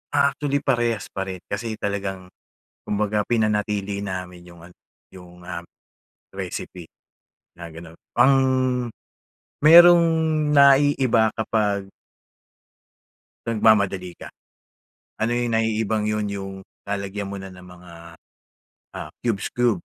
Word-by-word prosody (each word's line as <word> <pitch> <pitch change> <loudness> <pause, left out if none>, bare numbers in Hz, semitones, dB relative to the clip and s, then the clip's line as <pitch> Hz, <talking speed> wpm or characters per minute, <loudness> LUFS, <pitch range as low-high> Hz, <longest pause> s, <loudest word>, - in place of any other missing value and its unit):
Actually, 140 0 +1
parehas 120 -4 0
pa 95 0 -4
rin. 95 -1 -6
Kasi 110 +2 -4
talagang 95 -3 -4 0.6
kumbaga, 105 0 0
pinanatili 105 -3 0
namin 90 -2 -6
yung 85 -1 -15
ano 85 +1 -15 0.4
yung, 90 -1 -14
ah, 85 -1 -6 0.7
recipe 85 -3 -7 0.7
na 85 0 -9
ganun. 85 +1 -12 0.2
Ang 135 +1 +5 1.3
mayrong 170 +3 +8 0.5
naiiba 135 -5 +4
kapag 105 -3 -1 1.6
Nagmamadali 100 -5 +1
ka. - - -10 0.9
Ano 110 +2 +1
yung 120 -1 -1
naiibang 110 -1 0
yun 105 0 -1
yung 100 -1 -5 0.4
lalagyan 100 0 -4
mo 100 - -5
na 95 -1 -9
ng 90 0 -14
mga, 90 -1 -14 1.0
ah, - - -7
cubes, 115 -5 -2
cubes 120 -8 0
105 Hz, 105 wpm, -23 LUFS, 95-115 Hz, 1.6 s, mayrong